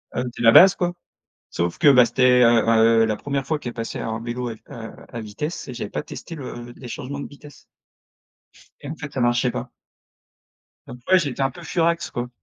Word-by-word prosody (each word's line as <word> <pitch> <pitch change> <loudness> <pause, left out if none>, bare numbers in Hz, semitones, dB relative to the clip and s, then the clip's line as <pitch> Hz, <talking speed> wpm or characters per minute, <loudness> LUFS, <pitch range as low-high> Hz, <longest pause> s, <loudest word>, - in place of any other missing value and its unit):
heu, 125 - -1
c'est - - -7
la 115 - +7
base 190 +9 +8
quoi, 175 -1 -1 0.6
sauf 85 0 -2
que - - +1
bah 125 -2 +7
c'était, 125 +1 +3
heu, 115 -1 +5
ben, 115 0 +4 0.2
heu, - - +4
la 110 -1 0
1re 140 +2 -3
fois 155 0 -1
qu'elle 120 - -6
passait 115 -1 -5
un 110 0 -4
vélo 120 +1 -4
à, - - -4
heu, 110 - -10 0.2
à 115 - -5
vitesse 140 +10 -6
et 125 - -6
j'avais 110 -4 -5
pas - - -3
testé 165 - -9
le 120 -4 -8
les 125 - -10
changements 140 +3 -6
de - - -6
vitesse 145 0 -15 1.2
et 145 - -9
en 155 - -5
fait 145 -2 -8
ça 130 - -2
marchait 120 +1 +2
pas. - - -6 1.2
Après, 125 +10 +1
j'étais 140 -5 -3
un 135 0 +1
peu - - -12
furax, 170 0 0
quoi. 120 0 -4
125 Hz, 210 wpm, -22 LUFS, 120-145 Hz, 1.2 s, base